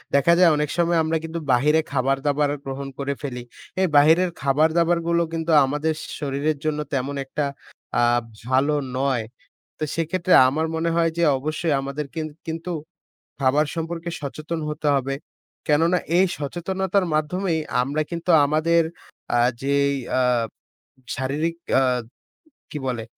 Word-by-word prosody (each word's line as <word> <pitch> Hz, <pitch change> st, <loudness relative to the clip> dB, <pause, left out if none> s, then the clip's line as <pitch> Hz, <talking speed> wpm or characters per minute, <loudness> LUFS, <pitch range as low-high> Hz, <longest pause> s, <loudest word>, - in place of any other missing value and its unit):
দেখা 140 Hz, +5 st, +5 dB
যায় 180 Hz, -2 st, +7 dB
অনেক 150 Hz, 0 st, -1 dB
সময় 170 Hz, 0 st, +2 dB
আমরা 160 Hz, +1 st, 0 dB
কিন্তু 165 Hz, +1 st, -4 dB
বাহিরে 150 Hz, +6 st, +4 dB
খাবার-দাবার 140 Hz, +2 st, +1 dB, 0.2 s
গ্রহণ 135 Hz, 0 st, -5 dB
করে 140 Hz, 0 st, -1 dB
ফেলি। 125 Hz, -4 st, -5 dB, 0.4 s
এই 190 Hz, -, +3 dB
বাহিরের 165 Hz, +5 st, +5 dB
খাবার-দাবারগুলো 170 Hz, +4 st, +2 dB
কিন্তু 165 Hz, 0 st, -1 dB
আমাদের 150 Hz, +4 st, -1 dB, 0.3 s
শরীরের 145 Hz, +1 st, -1 dB
জন্য 150 Hz, -1 st, 0 dB
তেমন 135 Hz, +2 st, -1 dB
একটা 145 Hz, +2 st, -2 dB, 0.6 s
আ -, -, +4 dB, 0.5 s
ভালো 135 Hz, +3 st, +3 dB, 0.2 s
নয়। 130 Hz, -4 st, +1 dB, 0.5 s
তো -, -, -4 dB
সেক্ষেত্রে 170 Hz, +2 st, 0 dB
আমার 155 Hz, +5 st, 0 dB
মনে 165 Hz, +1 st, 0 dB
হয় 165 Hz, -1 st, +2 dB
যে 170 Hz, -, +2 dB
অবশ্যই 155 Hz, +3 st, -1 dB
আমাদের 140 Hz, +2 st, -4 dB
কিন 160 Hz, -1 st, -2 dB, 0.2 s
কিন্তু 165 Hz, +2 st, -4 dB, 0.7 s
খাবার 140 Hz, +3 st, +3 dB
সম্পর্কে 165 Hz, +1 st, -4 dB
সচেতন 155 Hz, +3 st, -4 dB
হতে 150 Hz, 0 st, -3 dB
হবে। 135 Hz, 0 st, -1 dB, 0.5 s
কেননা 165 Hz, +4 st, +3 dB, 0.2 s
এই 190 Hz, -, +5 dB
সচেতনতার 185 Hz, +5 st, -1 dB
মাধ্যমেই 160 Hz, +2 st, 0 dB, 0.2 s
আমরা 145 Hz, +4 st, -1 dB
কিন্তু 170 Hz, +1 st, -1 dB
আমাদের 155 Hz, +3 st, +3 dB, 0.5 s
আ -, -, +4 dB, 0.2 s
যেই 140 Hz, 0 st, +2 dB, 0.2 s
আ -, -, +3 dB, 1.0 s
শারীরিক, 145 Hz, +5 st, -1 dB, 0.2 s
আ -, -, +2 dB, 0.9 s
কি -, -, -4 dB
বলে, 120 Hz, -3 st, -2 dB
155 Hz, 135 wpm, -23 LUFS, 140-170 Hz, 1.0 s, যায়